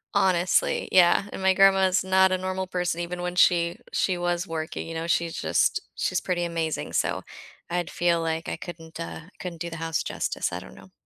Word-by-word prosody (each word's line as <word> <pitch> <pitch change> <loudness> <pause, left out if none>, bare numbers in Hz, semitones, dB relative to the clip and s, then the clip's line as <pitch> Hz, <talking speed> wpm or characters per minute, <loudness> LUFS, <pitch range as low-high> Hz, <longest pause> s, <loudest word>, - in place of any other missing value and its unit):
Honestly, 185 -2 +2
yeah, 185 +2 +5
and - - -6
my 190 0 +4
grandma 195 -1 +5
is 185 +1 +1
not 190 0 +4
a 185 - +2
normal 185 0 -3
person 180 -2 -1
even 175 +1 -4
when 180 0 -3
she 170 -1 +4
she 185 -2 +1
was 175 +1 -1
working, 160 0 -4
you 165 - -6
know, 165 +1 -3
she's 170 -1 0
just - - +1 0.2
she's - - 0
pretty 175 -2 -1
amazing, 165 -2 -2
so - - 0 0.5
I'd 175 -1 -1
feel 170 -1 +1
like 165 0 -2
I - - -2
couldn't, 165 -2 -9
uh, 165 - -6
I - - -18
couldn't 175 -2 -7
do 170 - -3
the 165 - -6
house 165 0 -1
justice, - - -2
I - - -4
don't 65 0 -13
know. - - -15
175 Hz, 210 wpm, -26 LUFS, 165-185 Hz, 0.5 s, yeah